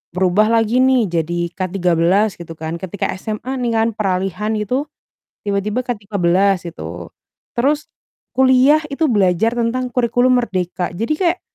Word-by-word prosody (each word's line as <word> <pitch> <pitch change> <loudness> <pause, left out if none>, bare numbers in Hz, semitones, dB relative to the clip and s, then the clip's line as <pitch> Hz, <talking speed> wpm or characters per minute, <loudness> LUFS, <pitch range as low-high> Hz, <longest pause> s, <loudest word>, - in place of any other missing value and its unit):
berubah 190 +3 +3
lagi 225 +1 +2
nih 260 -1 +4 0.2
jadi 170 +1 -2
K-13 185 +2 +1
gitu 165 -1 -8
kan, 160 +1 -5
ketika 190 +2 -3
SMA 215 +5 -5
nih 240 -1 0
kan 225 0 +3
peralihan 195 +2 -1
itu, 250 +8 -1 0.6
tiba-tiba 205 +4 -1
K-13 195 -4 +1
gitu, 85 +2 -8 0.4
terus 290 +5 +1 0.5
kuliah 265 +4 +5
itu 295 +3 0
belajar 205 +2 +2
tentang 245 +2 -1
Kurikulum 245 +1 +3
Merdeka 180 -5 -2
jadi 225 - -1
kayak 360 0 +1
210 Hz, 130 wpm, -18 LUFS, 180-245 Hz, 0.6 s, kuliah